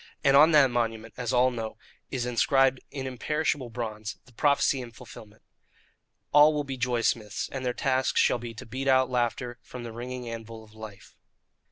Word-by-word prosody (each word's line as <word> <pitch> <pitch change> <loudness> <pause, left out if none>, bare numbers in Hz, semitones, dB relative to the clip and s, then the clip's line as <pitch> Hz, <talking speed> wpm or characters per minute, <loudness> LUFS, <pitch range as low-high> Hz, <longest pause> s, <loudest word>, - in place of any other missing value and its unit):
And 135 0 +5
on 150 +3 +8
that 140 -4 +6
monument, 115 -2 -2
as 125 -2 -3
all 125 +1 +4
know, 115 -2 -5 0.3
is 125 -3 -2
inscribed 130 +2 +3
in 135 -2 -6
imperishable 130 0 -2
bronze 110 -2 -5
the 125 - -20
prophecy 140 +1 +2
and 120 -2 -9
the - - -25
fulfilment: 105 -1 -13 0.9
"ALL 150 +1 +6
WILL 145 - 0
BE 135 -2 -5
JOY 125 -1 0
SMITHS, 105 -3 -1
AND 135 -1 -5
THEIR 125 -1 -1
TASK 130 -1 0
SHALL - - +3
BE 115 -1 -7
TO - - -9
BEAT 130 +4 -5
OUT 130 -1 +4
LAUGHTER 120 0 -1
FROM 125 -1 -9
THE 115 - -6
RINGING 125 +2 -6
ANVIL 115 -1 -7
OF 105 -1 -19
LIFE." 110 -2 -11
125 Hz, 190 wpm, -27 LUFS, 115-130 Hz, 0.9 s, on